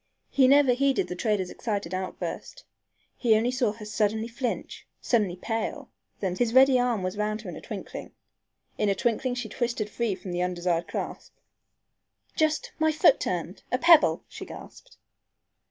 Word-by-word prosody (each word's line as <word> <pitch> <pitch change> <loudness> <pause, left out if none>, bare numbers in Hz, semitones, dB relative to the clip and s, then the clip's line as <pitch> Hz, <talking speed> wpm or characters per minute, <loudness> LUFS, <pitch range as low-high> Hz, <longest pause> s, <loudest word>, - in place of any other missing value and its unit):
He 265 -2 +5
never 275 -1 +6
heeded 275 +1 +1
the 180 - -4
trader's 200 -2 -1
excited 200 -6 -3
outburst. 190 - -5 0.5
He 230 -4 +3
only 230 +3 +2
saw 250 -4 +1
her 215 -1 -10
suddenly 215 +1 0
flinch, 240 +1 -4
suddenly 210 -7 +1
pale, 225 +8 -4 0.3
then 185 -3 -1
sway. - - -10
His 230 -1 -2
ready 260 -1 +7
arm 240 -5 0
was 185 +2 -3
round 215 +1 -1
her 190 - -7
in - - -8
a - - -9
twinkling. 210 -5 -7 0.7
In 210 - +2
a 195 - +2
twinkling 245 +4 0
she 245 - -4
twisted 235 -4 -2
free 230 -5 -1
from 185 0 -8
the 175 0 -1
undesired 175 -1 -1
clasp. - - -6 1.0
"Just 310 -1 0
my 315 0 +3
foot 310 -2 +5
turned! 175 +1 -3
a 250 - +2
pebble!" 335 +2 +5
she - - -9
gasped. - - -12
225 Hz, 170 wpm, -27 LUFS, 190-255 Hz, 1.0 s, ready